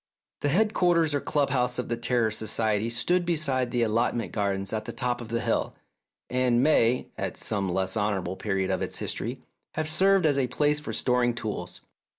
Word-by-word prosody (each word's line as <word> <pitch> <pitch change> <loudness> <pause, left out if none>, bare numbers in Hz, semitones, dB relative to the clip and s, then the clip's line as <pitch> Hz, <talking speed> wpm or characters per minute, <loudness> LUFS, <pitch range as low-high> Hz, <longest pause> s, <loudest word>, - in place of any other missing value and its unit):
The 145 - 0
headquarters 175 -4 +2
or 145 - 0
club 145 -2 0
house 125 -1 +1
of 125 - -2
the 120 - -1
Terror 115 -1 +1
Society 110 0 0
stood 175 +10 +1
beside 145 -7 0
the 120 -1 +1
allotment 115 -1 0
gardens 100 -1 -1
at 110 -1 -2
the - - -4
top 125 -1 -2
of 115 - -8
the 115 0 -1
hill, 115 -1 -1 0.5
and 125 -1 +2
may, 125 -5 +3
at - - -3
some 100 -3 -2
less 95 +1 -1
honourable 100 -4 -1
period 95 -2 -1
of 95 - -1
its - - -3
history, - - -4 0.3
have 155 -1 -1
served 190 +3 +3
as 145 -3 +3
a 130 - +1
place 150 +4 +1
for 150 - -6
storing 125 -1 +1
tools. 110 -3 -5
120 Hz, 185 wpm, -27 LUFS, 110-145 Hz, 0.5 s, may